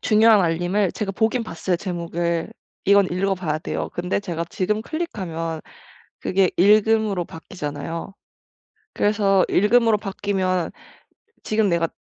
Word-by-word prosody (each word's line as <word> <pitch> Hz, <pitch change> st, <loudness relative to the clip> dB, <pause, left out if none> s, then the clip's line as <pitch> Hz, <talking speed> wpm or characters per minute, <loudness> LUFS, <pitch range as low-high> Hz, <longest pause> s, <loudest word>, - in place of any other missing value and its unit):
중요한 215 Hz, -1 st, +5 dB
알림을 175 Hz, +3 st, +1 dB
제가 210 Hz, -3 st, -3 dB
보긴 225 Hz, +4 st, +1 dB
봤어요 180 Hz, -3 st, -2 dB
제목을. 170 Hz, -2 st, -3 dB, 0.3 s
이건 200 Hz, -1 st, +5 dB
읽어 195 Hz, +2 st, +1 dB
봐야 155 Hz, -4 st, -2 dB
돼요. -, -, -4 dB
근데 180 Hz, +3 st, -1 dB
제가 170 Hz, -4 st, -3 dB
지금 210 Hz, +3 st, -1 dB
클릭하면 175 Hz, -, -4 dB, 0.6 s
그게 190 Hz, -1 st, +2 dB
"읽음."으로 210 Hz, -1 st, +4 dB
바뀌잖아요. 165 Hz, +1 st, -6 dB, 0.8 s
그래서 200 Hz, -2 st, +3 dB
"읽음."으로 225 Hz, +2 st, +4 dB
바뀌면 190 Hz, -3 st, -1 dB, 0.7 s
지금 215 Hz, -1 st, +1 dB
내가 170 Hz, -1 st, +1 dB
190 Hz, 295 characters per minute, -22 LUFS, 170-210 Hz, 0.8 s, 중요한